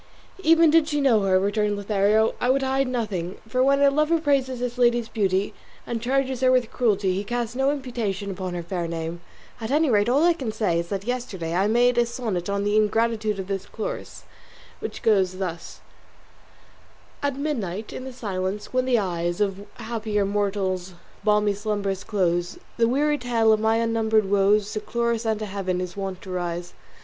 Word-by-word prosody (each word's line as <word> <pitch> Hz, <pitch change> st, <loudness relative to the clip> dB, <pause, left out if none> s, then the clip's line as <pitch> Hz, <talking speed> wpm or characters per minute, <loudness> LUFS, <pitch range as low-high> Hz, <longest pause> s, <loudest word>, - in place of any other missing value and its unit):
"Even 330 Hz, -2 st, +5 dB
did 320 Hz, -1 st, +4 dB
she 295 Hz, -2 st, 0 dB
know 255 Hz, -7 st, +4 dB
her," 190 Hz, -1 st, +3 dB
returned 205 Hz, +1 st, 0 dB
Lothario, 205 Hz, +2 st, +2 dB
"I 245 Hz, -, +1 dB
would 270 Hz, +1 st, +3 dB
hide 265 Hz, 0 st, +1 dB
nothing, 210 Hz, -8 st, -3 dB
for 255 Hz, +3 st, 0 dB
when 275 Hz, +2 st, +4 dB
a 280 Hz, -, +6 dB
lover 305 Hz, +3 st, +2 dB
praises 275 Hz, -4 st, +1 dB
his 245 Hz, 0 st, -3 dB
lady's 240 Hz, -1 st, +3 dB
beauty, 195 Hz, -2 st, 0 dB, 0.3 s
and 230 Hz, -1 st, -3 dB
charges 265 Hz, +1 st, 0 dB
her 255 Hz, -1 st, +4 dB
with 250 Hz, -3 st, +2 dB
cruelty, 205 Hz, -6 st, +1 dB
he 195 Hz, +2 st, -2 dB
casts 240 Hz, +2 st, -3 dB
no 270 Hz, +1 st, +2 dB
imputation 235 Hz, -8 st, -3 dB
upon 185 Hz, -2 st, -4 dB
her 175 Hz, -, -4 dB
fair 175 Hz, 0 st, -3 dB
name; 165 Hz, +1 st, -4 dB, 0.4 s
at 220 Hz, -, -5 dB
any 300 Hz, 0 st, +3 dB
rate, 205 Hz, +1 st, +3 dB
all 275 Hz, +5 st, +3 dB
I 345 Hz, 0 st, +5 dB
can 265 Hz, -9 st, -4 dB
say 190 Hz, -6 st, 0 dB
is 170 Hz, -, -3 dB
that 195 Hz, +1 st, -3 dB
yesterday 210 Hz, -9 st, -3 dB
I 190 Hz, +3 st, +2 dB
made 240 Hz, +2 st, +3 dB
a 240 Hz, -, +3 dB
sonnet 220 Hz, -7 st, -3 dB
on 200 Hz, 0 st, 0 dB
the 205 Hz, +1 st, +1 dB
ingratitude 215 Hz, 0 st, +1 dB
of 190 Hz, -, -4 dB
this 195 Hz, 0 st, -4 dB
Chloris, -, -, -6 dB, 0.6 s
which -, -, -6 dB
goes 190 Hz, -4 st, +2 dB
thus: 180 Hz, -3 st, -5 dB, 1.4 s
SONNET 285 Hz, -2 st, -1 dB
At -, -, -9 dB
midnight, 220 Hz, -, -3 dB
in -, -, -6 dB
the 260 Hz, -, -6 dB
silence, 200 Hz, -4 st, -4 dB
when 255 Hz, 0 st, +2 dB
the 255 Hz, -2 st, +3 dB
eyes 175 Hz, -3 st, -1 dB
Of 200 Hz, 0 st, -1 dB
happier 220 Hz, -3 st, -2 dB
mortals 195 Hz, -3 st, -1 dB, 0.3 s
balmy 210 Hz, -1 st, +3 dB
slumbers 200 Hz, -2 st, -2 dB
close, 175 Hz, -4 st, 0 dB, 0.2 s
The 230 Hz, -1 st, +3 dB
weary 295 Hz, +4 st, +1 dB
tale 230 Hz, -3 st, +3 dB
of 215 Hz, -, +2 dB
my 220 Hz, +1 st, +2 dB
unnumbered 220 Hz, -3 st, +1 dB
woes 205 Hz, +1 st, +3 dB
To 215 Hz, -, -2 dB
Chloris 235 Hz, +1 st, -1 dB
and 220 Hz, -1 st, +1 dB
to -, -, -2 dB
Heaven 190 Hz, -2 st, -2 dB
is 180 Hz, -1 st, -5 dB
wont 195 Hz, -2 st, -5 dB
to 190 Hz, -, -8 dB
rise. 175 Hz, -1 st, -3 dB
215 Hz, 190 wpm, -24 LUFS, 195-245 Hz, 1.4 s, a